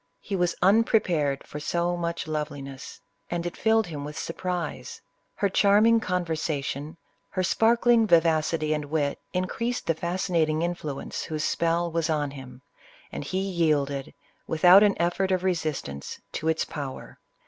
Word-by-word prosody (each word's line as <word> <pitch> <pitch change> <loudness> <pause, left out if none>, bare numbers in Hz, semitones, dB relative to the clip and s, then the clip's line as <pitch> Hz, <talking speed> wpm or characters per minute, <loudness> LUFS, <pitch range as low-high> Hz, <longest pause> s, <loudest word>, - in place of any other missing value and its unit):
He 200 - -4
was 175 -1 +1
unprepared 185 -9 +2
for 150 - -7
so 175 +3 0
much 170 -1 -3
loveliness, 145 -3 -5 0.3
and 175 0 -2
it 175 - -4
filled 220 0 +2
him 150 -4 -6
with 150 +1 -7
surprise. 180 +1 -4 0.4
Her 200 - +1
charm 200 +2 +4
ing 230 0 +5
conversation, 160 -5 -2 0.3
her 185 - -1
sparkling 230 +3 +3
vivacity 160 -2 +3
and 150 -1 -2
wit, 145 -1 -1
in 185 0 0
creased 235 +6 -3
the 165 - +2
fascinating 165 -2 0
influence 165 -5 -4
whose 155 -2 -3
spell 170 0 0
was 165 -1 -1
on 150 -3 0
him, 130 -2 -11 0.5
and - - -5
he 185 +7 -2
yielded, 150 -7 0 0.3
without 180 +4 +7
an 205 -2 +3
effort 175 +3 +1
of 185 -1 +1
resistance, 155 - -3
to 160 - -4
its 160 0 +1
power. 140 -3 -7
170 Hz, 150 wpm, -26 LUFS, 150-185 Hz, 0.5 s, without